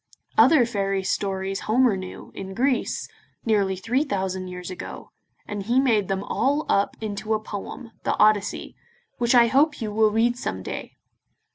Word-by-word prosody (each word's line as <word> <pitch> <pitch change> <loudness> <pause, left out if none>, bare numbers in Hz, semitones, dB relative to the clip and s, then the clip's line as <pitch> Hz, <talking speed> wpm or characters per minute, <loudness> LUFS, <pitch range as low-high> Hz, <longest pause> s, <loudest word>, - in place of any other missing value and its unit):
Other 300 -7 +6
fairy 195 -4 -1
stories 195 0 -1
Homer 240 -1 +4
knew, 185 -1 -8
in 190 0 -7
Greece, 255 +2 0 0.4
nearly 200 -4 +2
three 235 +9 0
thousand 190 -7 -2
years 180 0 -7
ago, 185 - -8 0.4
and 205 -1 -4
he 235 +6 +2
made 225 -7 +2
them 195 0 -1
all 285 +8 0
up 200 0 +1
into 215 0 -2
a - - -1
poem, 215 +2 -7
the - - 0
Odyssey, 210 -1 +2 0.4
which 240 +1 +3
I 240 -1 +8
hope 280 +6 +3
you 220 -3 -3
will 215 +1 +4
read 230 +3 +2
some 95 - -4
day. - - -6
210 Hz, 160 wpm, -24 LUFS, 195-240 Hz, 0.4 s, I